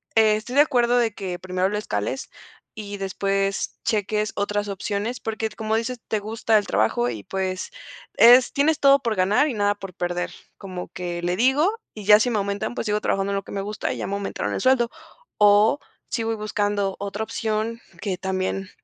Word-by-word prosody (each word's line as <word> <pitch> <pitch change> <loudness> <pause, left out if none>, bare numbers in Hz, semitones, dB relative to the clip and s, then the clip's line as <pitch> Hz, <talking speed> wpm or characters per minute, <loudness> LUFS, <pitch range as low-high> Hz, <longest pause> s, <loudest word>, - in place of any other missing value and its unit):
Eh, 220 -1 +5
estoy 220 +3 -7
de 285 - +8
acuerdo 245 -4 +3
de 230 -2 +2
que, 180 -2 -5
primero 185 0 -1
lo 210 - -2
escales, 105 - -3 0.5
y 205 -1 -6
después 195 0 -1
cheques 210 0 0
otras 205 0 -1
opciones, 205 +4 -3
porque 220 0 -2
como 220 0 -2
dices, 230 +1 -3
te 215 - +1
gusta 220 +1 +1
el 205 - -1
trabajo 110 +4 +1
y, 110 -4 -6
pues 185 - -3 0.4
es 245 +2 +7
Tienes 300 +2 +2
todo 275 0 +6
por 230 -5 -1
ganar 200 +10 +3
y - - -2
nada 205 -1 +2
por 195 -2 -9
perder. 175 0 -2 0.3
Como 185 -3 -7
que 175 -1 -5
le 175 +1 0
digo, 270 - +3 0.2
y 210 - -8
ya 210 +1 +8
si 245 - +2
me 225 - 0
aumentan, 200 +3 -2
pues, - - -3
sigo 210 0 +1
trabajando 195 0 0
en - - 0
lo 195 - -3
que - - -10
me 200 - -2
gusta, 210 +1 -3
y - - -7
ya - - -3
me 195 - -4
aumentaron 200 0 -3
el - - -2
sueldo. 255 -2 +3 0.5
O, 210 +5 +5 0.3
sí 230 - -1
voy 225 0 -1
buscando 205 -2 -1
otra 200 +2 -3
opción, 220 +1 -2 0.2
que 195 -4 -2
también 190 +1 -2
205 Hz, 200 wpm, -23 LUFS, 195-225 Hz, 0.5 s, de